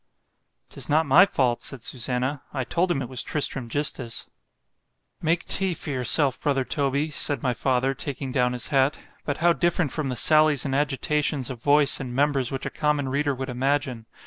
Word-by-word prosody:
——'tis -, -, -7 dB
not 155 Hz, +2 st, +3 dB
my 160 Hz, +8 st, +6 dB
fault, 125 Hz, -9 st, 0 dB
said 135 Hz, -, -7 dB
Susannah—I 130 Hz, +2 st, -3 dB
told 175 Hz, +8 st, -1 dB
him 140 Hz, -6 st, -1 dB
it -, -, -6 dB
was 125 Hz, 0 st, -1 dB
Tristram 135 Hz, -4 st, -1 dB
gistus. 130 Hz, -4 st, -2 dB, 0.9 s
——Make 165 Hz, +2 st, 0 dB
tea 190 Hz, -3 st, +6 dB
for 150 Hz, -, -4 dB
yourself, 130 Hz, +1 st, +3 dB
brother 135 Hz, -3 st, 0 dB
Toby, 140 Hz, +1 st, -1 dB
said 145 Hz, -3 st, -1 dB
my 125 Hz, -2 st, +1 dB
father, 130 Hz, +2 st, 0 dB
taking 135 Hz, 0 st, -4 dB
down 125 Hz, -1 st, +1 dB
his 125 Hz, -2 st, -4 dB
hat——but 140 Hz, +1 st, -1 dB
how 170 Hz, +1 st, +3 dB
different 170 Hz, -4 st, 0 dB
from 155 Hz, -4 st, -3 dB
the 125 Hz, -, -3 dB
sallies 155 Hz, +1 st, +3 dB
and 135 Hz, -, -2 dB
agitations 145 Hz, -1 st, -1 dB
of 120 Hz, -3 st, -9 dB
voice 145 Hz, +1 st, +3 dB
and 125 Hz, -2 st, -6 dB
members 140 Hz, -2 st, +1 dB
which 135 Hz, -1 st, -5 dB
a -, -, -4 dB
common 150 Hz, -3 st, -1 dB
reader 140 Hz, +1 st, -1 dB
would 130 Hz, 0 st, -5 dB
imagine! 130 Hz, -2 st, -2 dB
140 Hz, 175 wpm, -24 LUFS, 130-150 Hz, 0.9 s, my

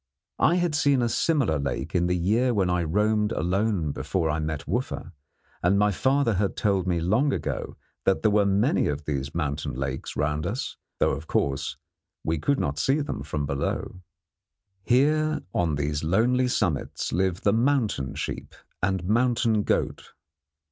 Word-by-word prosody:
I 170 Hz, -, +4 dB
had 175 Hz, -3 st, +1 dB
seen 140 Hz, -3 st, +3 dB
a -, -, +2 dB
similar 120 Hz, -, +1 dB
lake 70 Hz, +2 st, -3 dB
in 90 Hz, -1 st, +2 dB
the 90 Hz, 0 st, +1 dB
year 115 Hz, +8 st, +2 dB
when 95 Hz, -3 st, +2 dB
I 90 Hz, 0 st, +1 dB
roamed 105 Hz, +5 st, +1 dB
alone 90 Hz, -1 st, 0 dB
before 80 Hz, +1 st, -1 dB
I 75 Hz, -, -1 dB
met 75 Hz, -1 st, -3 dB
Wooffa, 120 Hz, -7 st, -3 dB, 0.5 s
and 90 Hz, +3 st, +3 dB
my 105 Hz, +1 st, +3 dB
father 130 Hz, +4 st, +2 dB
had 100 Hz, 0 st, -1 dB
told 100 Hz, -3 st, +1 dB
me 85 Hz, -2 st, +1 dB
long 110 Hz, -, +2 dB
ago -, -, -3 dB, 0.3 s
that 95 Hz, -, +2 dB
there 110 Hz, -, +4 dB
were 105 Hz, -1 st, +3 dB
many 105 Hz, +9 st, +2 dB
of 75 Hz, +1 st, -3 dB
these 70 Hz, -1 st, -3 dB
mountain 70 Hz, -4 st, -2 dB
lakes 65 Hz, 0 st, -4 dB
round 75 Hz, +1 st, -1 dB
us, 125 Hz, +7 st, -3 dB, 0.2 s
though, -, -, +2 dB
of -, -, -5 dB
course, 70 Hz, -1 st, -1 dB, 0.5 s
we 80 Hz, -1 st, -1 dB
could 140 Hz, -, +1 dB
not 70 Hz, +1 st, -1 dB
see 135 Hz, -, +2 dB
them 145 Hz, -, -3 dB
from 75 Hz, 0 st, -3 dB
below. 70 Hz, +5 st, -3 dB, 0.8 s
Here 150 Hz, +7 st, +2 dB
on 85 Hz, -4 st, +1 dB
these 75 Hz, +1 st, -2 dB
lonely 120 Hz, +10 st, +2 dB
summits 90 Hz, -, -1 dB
live 95 Hz, 0 st, 0 dB
the 100 Hz, -, +3 dB
mountain 115 Hz, -, +1 dB
sheep -, -, -5 dB, 0.3 s
and 95 Hz, -1 st, 0 dB
mountain 115 Hz, +1 st, +2 dB
goat. -, -, -2 dB
95 Hz, 165 wpm, -26 LUFS, 75-120 Hz, 0.8 s, I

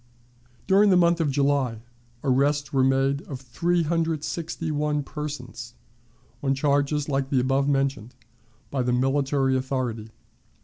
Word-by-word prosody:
During 200 Hz, +2 st, +5 dB
the 185 Hz, -, +5 dB
month 170 Hz, -1 st, +3 dB
of 155 Hz, -, +1 dB
July 135 Hz, -5 st, 0 dB, 0.4 s
arrests 140 Hz, +1 st, +1 dB
were 135 Hz, -1 st, +3 dB
made 135 Hz, +1 st, +2 dB
of 135 Hz, -3 st, -6 dB
361 160 Hz, 0 st, -1 dB
persons, 125 Hz, -6 st, -7 dB, 0.7 s
on 135 Hz, -1 st, +1 dB
charges 145 Hz, +1 st, +1 dB
like 135 Hz, -2 st, -1 dB
the 135 Hz, -, +2 dB
above 135 Hz, +2 st, +1 dB
mentioned, 135 Hz, -4 st, -1 dB, 0.6 s
by 135 Hz, -, 0 dB
the 125 Hz, 0 st, 0 dB
military 135 Hz, +1 st, +1 dB
authority. 130 Hz, -4 st, -2 dB
140 Hz, 120 wpm, -25 LUFS, 130-150 Hz, 0.7 s, During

